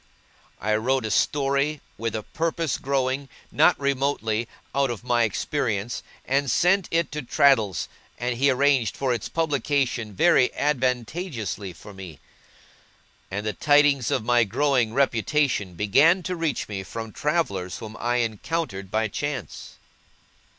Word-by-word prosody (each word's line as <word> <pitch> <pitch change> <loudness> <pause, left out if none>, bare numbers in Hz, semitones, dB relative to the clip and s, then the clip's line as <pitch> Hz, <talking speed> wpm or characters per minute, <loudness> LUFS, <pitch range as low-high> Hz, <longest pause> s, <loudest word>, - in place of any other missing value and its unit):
I 110 0 +1
wrote 130 +3 0
a 110 - -2
Story, 140 +3 +1 0.2
with 115 -1 -3
a 110 - -3
purpose 165 0 -2
growing, 135 0 -1 0.2
not - - +4
remotely, 135 -5 0 0.3
out 140 0 +2
of 120 -2 -5
my 120 -1 +2
experience, 110 0 -2 0.2
and 140 +1 +1
sent 180 +7 +3
it 165 0 0
to 150 0 -3
Traddles, 125 - +3 0.3
and 120 0 -2
he 140 +4 +3
arranged 135 -4 +2
for 130 -2 0
its 115 - -4
publication 140 -8 -1
very 165 - +5
advantageously 125 - -2
for 105 +4 -13
me; 95 -6 -10 1.1
and 100 +2 -4
the 110 - -1
tidings 145 -4 +3
of 110 - -1
my 120 0 +4
growing 125 +1 +1
reputation 135 - +1
began 145 - +4
to 180 +1 -3
reach 165 -7 -2
me 100 -2 -4
from 110 +3 -7
travellers 100 - -1
whom 110 0 -8
I 120 +1 +1
encountered 110 - -4
by 110 +2 0
chance. 135 +1 -5
130 Hz, 135 wpm, -25 LUFS, 110-145 Hz, 1.1 s, very